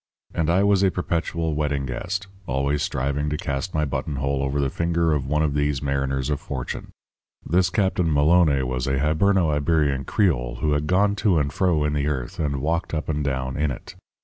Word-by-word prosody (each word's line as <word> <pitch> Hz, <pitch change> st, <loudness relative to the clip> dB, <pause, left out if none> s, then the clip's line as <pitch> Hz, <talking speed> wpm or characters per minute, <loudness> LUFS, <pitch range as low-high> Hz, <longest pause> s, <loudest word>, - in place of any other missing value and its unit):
And 80 Hz, -1 st, 0 dB
I 90 Hz, +3 st, +3 dB
was 100 Hz, -1 st, +3 dB
a 95 Hz, -, +4 dB
perpetual 85 Hz, -2 st, -2 dB
wedding 75 Hz, -2 st, -1 dB
guest, 90 Hz, +10 st, -3 dB, 0.2 s
always 70 Hz, +2 st, 0 dB
striving 70 Hz, +3 st, -1 dB
to 75 Hz, -, -2 dB
cast 70 Hz, +6 st, -3 dB
my 75 Hz, -1 st, +2 dB
buttonhole 70 Hz, -1 st, -2 dB
over 70 Hz, +1 st, -1 dB
the 70 Hz, -2 st, 0 dB
finger 85 Hz, -1 st, +1 dB
of 70 Hz, -3 st, -1 dB
one 75 Hz, +2 st, +1 dB
of 75 Hz, -2 st, 0 dB
these 75 Hz, -1 st, 0 dB
mariners 70 Hz, 0 st, -1 dB
of 75 Hz, -, 0 dB
fortune. -, -, -5 dB, 0.6 s
This 90 Hz, +2 st, +2 dB
Captain 90 Hz, -3 st, +1 dB
Maloné 75 Hz, -1 st, +4 dB
was 65 Hz, 0 st, -2 dB
a 70 Hz, 0 st, +1 dB
Hiberno 80 Hz, +4 st, +2 dB
Iberian 75 Hz, -2 st, +1 dB
creole 65 Hz, -, +1 dB
who 75 Hz, +4 st, -1 dB
had 75 Hz, +1 st, 0 dB
gone 100 Hz, +3 st, +3 dB
to 100 Hz, -5 st, +2 dB
and 70 Hz, -2 st, 0 dB
fro 85 Hz, -5 st, +2 dB
in 75 Hz, 0 st, 0 dB
the 70 Hz, -1 st, 0 dB
earth 65 Hz, -5 st, -3 dB
and 70 Hz, -3 st, -1 dB
walked 80 Hz, +2 st, -1 dB
up 75 Hz, -, -3 dB
and 75 Hz, -1 st, -1 dB
down 65 Hz, -2 st, -2 dB
in 75 Hz, 0 st, 0 dB
it. 65 Hz, -, -7 dB
75 Hz, 200 wpm, -24 LUFS, 70-85 Hz, 0.6 s, a